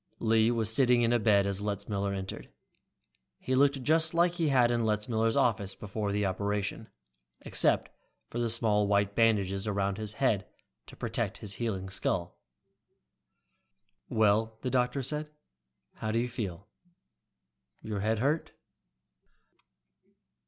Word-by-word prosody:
Lee 110 0 +3
was 110 -2 +1
sitting 125 -2 +4
up 115 - +1
in 120 -1 +2
bed 100 -3 +4
as 100 0 -2
Letzmiller 100 -1 -2
entered. 95 -1 -6 0.9
He 130 - -3
looked 140 0 +3
just 160 +3 +3
like 170 +1 +4
he 170 -2 -1
had 125 -4 +4
in 120 -1 +1
Letzmiller's 110 +1 0
office 100 -5 +1
before 105 0 -4
the 105 0 0
operation, 100 +3 -2 0.5
except - - +1 0.4
for 120 - -5
the 120 -1 0
small 110 -3 +1
white 100 0 +2
bandages 100 -3 +2
around 100 -1 -1
his 105 -1 -4
head 110 -6 0 0.4
to - - -12
protect - - -2
his 100 -2 -4
healing 95 -5 -2
skull. 95 -2 -2 1.7
"Well," 110 +1 +2
the 125 - -2
doctor 125 +2 +1
said, 150 +3 -2 0.7
"how 110 - -3
do 115 - 0
you 120 +1 +1
feel? 100 -6 -5 1.2
Your 105 -2 -3
head 110 +3 0
hurt?" 145 +8 0
110 Hz, 135 wpm, -30 LUFS, 100-120 Hz, 1.7 s, sitting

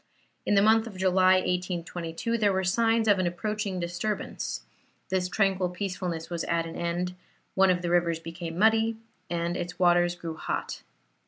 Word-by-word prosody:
In 205 - +3
the 200 - +5
month 220 +1 +4
of 200 -4 -9
July, 185 0 +4
1822, 180 +2 -2
there 205 -2 +3
were 190 0 0
signs 225 +4 +2
of 205 -2 +5
an 185 - +1
approaching 205 +1 -2
disturbance; 175 +5 -3 0.5
this 185 -1 0
tranquil 190 -2 +1
peacefulness 180 -3 -4
was 170 -2 -3
at 165 -1 0
an 165 - -7
end; 175 +1 -2 0.4
one 195 0 +4
of 180 -1 +1
the 175 - -1
rivers 170 -2 +2
became 165 0 -7
muddy, 225 +2 +3 0.3
and 170 0 -1
its 175 0 -4
waters 175 -1 +3
grew 165 -2 -6
hot. - - -4
180 Hz, 165 wpm, -27 LUFS, 175-200 Hz, 0.5 s, the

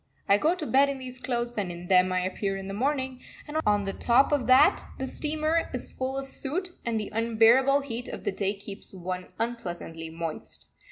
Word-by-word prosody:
I 200 +1 +5
go 320 +8 +3
to 345 -4 -4
bed 280 0 +4
in 280 - -3
these 255 -1 -6
clothes 240 -1 -2
and 190 -3 -2
in 175 0 -8
them 185 0 +5
I 185 0 +1
appear 195 +2 -2
in 195 0 -6
the 195 - -5
morning, 260 +2 -1 0.3
and 295 +1 -3
on 205 -1 +3
the 195 - -2
top 245 +5 +3
of 275 -6 +1
that 255 +1 +6
the 265 - -3
steamer 310 +4 0
is 250 - -2
full 260 +1 -3
of 270 - -2
soot, 305 +7 -3
and 230 -2 -1
the 210 - -5
unbearable 230 +5 +4
heat 245 -3 -5
of - - -7
the - - 0
day 200 0 -1
keeps 200 0 -9
one 180 0 -5
unpleasantly 175 -8 -4
moist. 165 -1 -6
235 Hz, 210 wpm, -27 LUFS, 195-270 Hz, 0.3 s, that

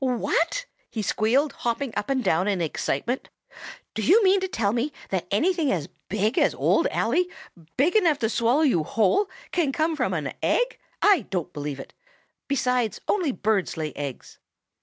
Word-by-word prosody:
"What?" 325 - 0 0.2
he 220 - -4
squealed, 255 +9 +1
hopping 240 +1 -2
up 230 - -2
and 265 -2 +1
down 180 +1 +2
in 200 -3 +1
excitement. 170 - -2 0.6
"Do 220 - -3
you 400 - +5
mean 390 0 +5
to 380 - -2
tell 220 - 0
me 245 +5 -1 0.2
that 190 -3 -1
anything 320 - +1
as 165 -6 -2 0.2
big 210 +5 +1
as - - +2
Old - - +2
Ally, 315 +11 +1 0.5
big 300 +9 +3
enough 340 -9 +4
to - - +1
swallow 240 +7 +2
you 210 - +3
whole, 220 - +2 0.2
can 320 -6 +1
come 315 +3 0
from - - 0
an - - -3
egg? - - +1 0.2
I 390 - +4
don't 180 -2 -3
believe 145 -2 -5
it! - - -10 0.5
Besides, 250 -4 0
only 355 -9 +1
birds 210 -7 0
lay 155 -2 -3
eggs." 140 -3 -7
245 Hz, 170 wpm, -25 LUFS, 200-315 Hz, 0.6 s, you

